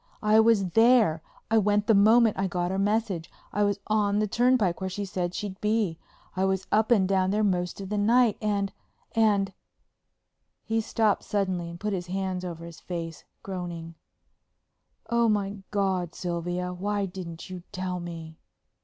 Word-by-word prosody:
I 215 +1 +5
was 220 -4 +4
there; 225 -8 +4 0.3
I 225 - +5
went 205 0 +2
the 225 - +4
moment 220 +2 +5
I 195 0 0
got 175 0 -2
her 190 - -1
message. 200 -4 0 0.2
I 205 - 0
was 205 0 +1
on 210 -1 +1
the 215 - +2
turnpike 225 -5 +2
where 190 - -2
she 200 +2 -4
said 180 -2 -3
she'd 200 -3 -5
be. 210 -6 0 0.4
I 190 - 0
was 190 0 0
up 220 +1 +3
and 205 -6 +4
down 190 -1 +2
there 210 +2 +1
most 180 -3 0
of 195 -1 -6
the 210 0 -1
night. 230 +1 +4
And—and——" 205 0 -1 1.1
he 225 0 0
stopped 220 -1 +1
suddenly 185 -4 -1
and 170 0 -9
put 210 +1 -2
his 180 -2 -3
hands 185 0 -2
over 170 -2 -6
his 170 -2 -10
face, 165 -3 -6 0.2
groaning, 175 -3 -6 1.2
"Oh, 235 -1 +3
my 205 -1 0
God, 190 -4 -1
Sylvia—why 180 +3 -2
didn't 180 -2 -8
you 180 -1 -6
tell 185 -1 -3
me?" 165 -2 -8
195 Hz, 160 wpm, -27 LUFS, 180-210 Hz, 1.2 s, I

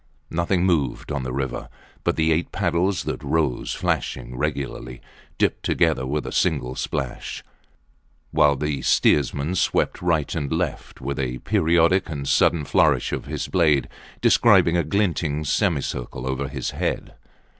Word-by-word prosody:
Nothing 85 +2 +1
moved 80 -5 0
on 70 -2 -1
the 65 0 -4
river 65 0 -3 0.3
but - - +1
the 80 0 +2
eight 80 +1 0
paddles 90 +2 0
that - - -4
rose 75 -7 0
flashing 60 -1 -2
regularly, 65 -1 -3 0.4
dipped - - +1
together 65 - +1
with 75 +2 -2
a - - -5
single 70 -8 0
splash; 65 - -4 0.9
while 70 -1 +4
the 75 -1 -2
steersman 70 +5 +2
swept 95 - 0
right 85 -5 +1
and 70 -4 -3
left 80 -2 -3
with 70 +2 -3
a 65 -1 -2
periodic 85 +7 +2
and 70 -3 -4
sudden 80 +1 +3
flourish - - +2
of - - -3
his - - -4
blade 75 -8 +2 0.3
describing 85 - +5
a 85 - +2
glinting 80 -4 0
semicircle 70 - -1
above 65 +1 -2
his - - -3
head. - - -3
75 Hz, 145 wpm, -23 LUFS, 65-85 Hz, 0.9 s, describing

